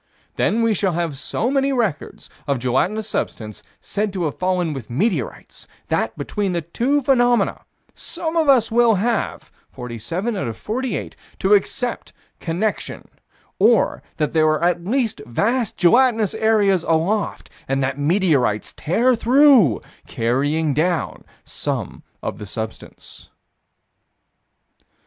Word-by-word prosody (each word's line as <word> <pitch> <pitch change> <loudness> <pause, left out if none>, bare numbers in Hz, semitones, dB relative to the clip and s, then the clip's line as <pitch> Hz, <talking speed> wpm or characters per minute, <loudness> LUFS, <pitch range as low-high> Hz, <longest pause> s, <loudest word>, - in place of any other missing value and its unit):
Then 230 +3 +1
we 225 -1 +3
shall 195 -2 0
have 165 -3 -2
so 220 - -2
many 275 0 +1
records 220 - -2 0.2
of 140 -2 +1
gelatinous 155 - 0
substance 110 - -4 0.2
said 210 0 -2
to 185 -3 -2
have 150 - -3
fallen 180 -3 0
with 130 -5 -8
meteorites, 155 - -3 0.2
that, 110 0 -1
between 190 +6 -2
the 170 -2 -2
two 260 - 0
phenomena, 245 -2 +2 0.3
some 325 0 -5
of 320 -3 +2
us 245 -6 +4
will 235 -1 +4
have 225 +3 -2 0.2
to 190 - -3
accept 240 +4 0 0.3
connection 185 +6 -3 0.5
or - - +3 0.2
that 150 -2 -1
there 155 -1 +4
are 155 +1 +1
at 175 0 +1
least 225 - -1
vast 225 - 0
gelatinous 225 +2 +3
areas 205 -5 +2
aloft, 170 +7 -1 0.2
and 135 0 0
that 135 +2 -2
meteorites 145 - +1
tear 240 +10 +2
through, 245 - +5 0.3
carrying 145 +6 0
down 165 +3 -1 0.2
some - - -4 0.2
of - - -4
the 105 - -7
substance. 110 +2 -8
185 Hz, 120 wpm, -21 LUFS, 145-230 Hz, 0.5 s, through